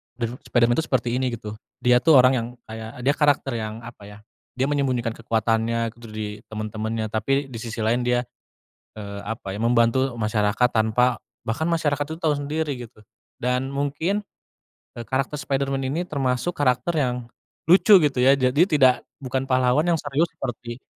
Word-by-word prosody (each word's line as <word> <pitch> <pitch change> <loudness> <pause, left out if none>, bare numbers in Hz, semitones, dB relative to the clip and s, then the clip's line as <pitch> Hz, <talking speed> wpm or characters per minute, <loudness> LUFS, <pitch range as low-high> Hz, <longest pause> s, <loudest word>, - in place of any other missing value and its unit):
Dan 120 +1 -4
Spiderman 120 0 +3
tuh 160 - -2
seperti 125 -2 0
ini 130 0 0
gitu, 110 -1 -8 0.3
dia 125 0 +5
tuh 160 +4 +5
orang 130 +1 +6
yang 115 -1 -2 0.2
kayak 110 0 -8
dia 140 - +4
karakter 145 -3 +2
yang 110 +1 -6
apa 115 -3 -11
ya, 105 0 -12 0.4
dia 130 - +1
menyembunyikan 130 -5 0
kekuatannya 115 0 0
gitu 120 0 -15
dari 105 -1 -5
temen-temennya 110 0 -4
tapi 135 +6 0
di 115 - -6
sisi 115 -2 -4
lain 120 +3 +2
dia, 125 0 +2 0.7
eee, 100 -1 -7
apa 110 -3 -5
ya, 105 - -6
membantu 120 +3 +3
masyarakat 110 +2 +1
tanpa 115 +2 +2 0.3
bahkan 155 +9 -1
masyarakat 150 -3 0
tuh 160 +1 -6
tau 155 -2 +2
sendiri 145 -1 -2
gitu 110 -2 -21 0.3
dan 125 +2 -1
mungkin, 145 +9 -1 0.8
eee, 120 - -5
karakter 135 +3 -1
Spiderman 135 0 -1
ini 150 +6 -1
termasuk 135 +2 -1
karakter 130 +4 +1
yang 125 -4 -1 0.4
lucu 195 +2 +7
gitu 145 -3 +1
ya, 130 +2 +6
jadi 130 +3 +2
tidak 135 -8 +5 0.3
bukan 130 +1 -2
pahlawan 130 +4 +2
yang 170 -2 +2
serius 145 +3 +1
seperti, 120 0 -6
125 Hz, 165 wpm, -23 LUFS, 115-140 Hz, 0.8 s, lucu